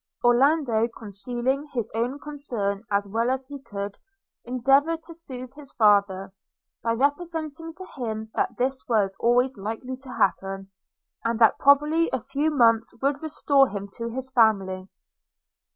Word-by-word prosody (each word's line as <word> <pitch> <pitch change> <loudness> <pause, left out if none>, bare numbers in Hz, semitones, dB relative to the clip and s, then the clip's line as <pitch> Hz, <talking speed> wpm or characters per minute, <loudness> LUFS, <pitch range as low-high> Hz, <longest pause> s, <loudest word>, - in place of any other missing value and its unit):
Orlando, 240 -2 +3
concealing 240 +6 -3
his 235 -4 -1
own 240 +5 -1
concern 240 -10 -3
as 200 0 +1
well 225 +4 0
as 260 0 0
he 285 +1 -8
could, 200 -4 -6 0.4
endeavoured 275 +7 +2
to 335 - -10
sooth 260 -6 -8
his 285 -1 -12
father, 200 -3 +3 0.5
by 230 0 0
representing 315 +4 -1
to 375 +1 -8
him 220 -2 -4
that 245 - -1
this 260 +2 0
was 205 -5 +1
always 245 0 +2
likely 225 +6 -4
to 265 0 -12
happen, 195 -1 -1 0.5
and 230 0 0
that 225 -1 +5
probably 295 +4 +4
a - - -1
few 275 +5 -1
months 230 -6 +3
would 275 +2 0
restore 285 -3 +3
him 200 -1 -5
to 230 0 -3
his 260 +2 -5
family. 195 -6 +2
245 Hz, 145 wpm, -25 LUFS, 220-280 Hz, 0.5 s, that